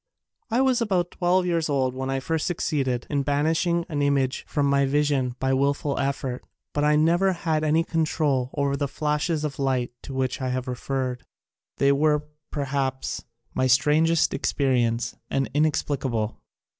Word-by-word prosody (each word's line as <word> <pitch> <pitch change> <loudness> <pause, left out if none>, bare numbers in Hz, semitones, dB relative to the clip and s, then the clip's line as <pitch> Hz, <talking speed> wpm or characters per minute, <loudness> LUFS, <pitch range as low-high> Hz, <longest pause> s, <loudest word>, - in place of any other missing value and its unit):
I 235 +3 +2
was 260 -2 +2
about 185 -6 0
twelve 180 +1 +2
years 170 -3 0
old 130 -3 +1
when 130 +1 -4
I 135 0 0
first 160 +4 -1
succeeded 135 -8 -1
in 145 -2 0
banishing 160 +4 +1
an 145 -3 -2
image 140 -2 +1
from 145 -2 0
my 140 0 +3
vision 140 -3 +1
by 130 +1 0
wilful 140 +1 0
effort, 135 -2 -2 0.3
but 145 - 0
I 150 0 +4
never 170 +5 +3
had 160 -3 -1
any 155 +2 +3
control 155 -6 0
over 140 -1 +1
the 140 0 -1
flashes 150 +2 -1
of 145 -2 -4
light 130 -3 0
to 135 - -8
which 130 0 -1
I 130 - -1
have 130 +1 -2
referred. 125 0 -3 0.5
They 140 0 +4
were, 150 +1 +2 0.3
per 145 - -2
haps, 135 -1 -2 0.3
my 130 - +1
strangest 150 +6 +3
experience 120 -4 0
and 135 -1 -1
inex 150 -1 +2
plicable. 120 -6 -2
140 Hz, 165 wpm, -25 LUFS, 130-155 Hz, 0.5 s, I